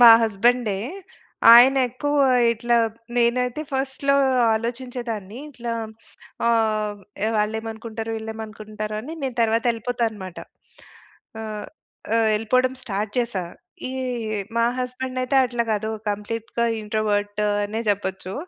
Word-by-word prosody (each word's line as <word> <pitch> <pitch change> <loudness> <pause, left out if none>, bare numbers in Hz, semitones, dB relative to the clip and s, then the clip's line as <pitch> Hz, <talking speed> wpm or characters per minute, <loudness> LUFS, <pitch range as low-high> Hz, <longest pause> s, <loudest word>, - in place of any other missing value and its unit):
మా 240 - +11
హస్బెండే. 220 0 +2 0.7
ఆయనెక్కువ 260 +3 +5 0.4
ఇట్లా 235 +1 +1 0.4
నేనైతే 245 +3 +1
ఫస్ట్‌లో 270 +1 +1 0.4
ఆలోచించేదాన్ని. 235 -2 -4
ఇట్లా 240 -3 -5 0.8
ఆహ్, 215 -3 +1 0.4
వాళ్ళేమనుకుంటారో 220 +1 -3
వీళ్ళేమనుకుంటారో 215 -1 -6
అని 295 +9 -7
నేను 260 -2 -3
తరువాత 230 0 +2
యెళ్ళిపోతా 235 +1 -1
అనమాట. 190 -5 -9 1.0
ఆహ్, 215 -1 -5 0.5
ఆహ్, 225 -1 +3
యెళ్ళిపోడం 255 +4 +2
స్టార్ట్ 205 -2 -3
చేశా. 235 -7 -1 0.5
ఈ - - -5 0.7
మా 230 - +4
హస్బెండయితే 255 +1 -2
అట్లా 240 -1 -1
కాదు. 215 +1 -1 0.2
కంప్లీట్‌గా 225 +3 -2 0.2
ఇంట్రోవర్టు 210 -1 0 0.2
అనే 210 +2 -3
జెప్పొచ్చు. 190 -2 -1
225 Hz, 95 wpm, -23 LUFS, 210-245 Hz, 1.0 s, మా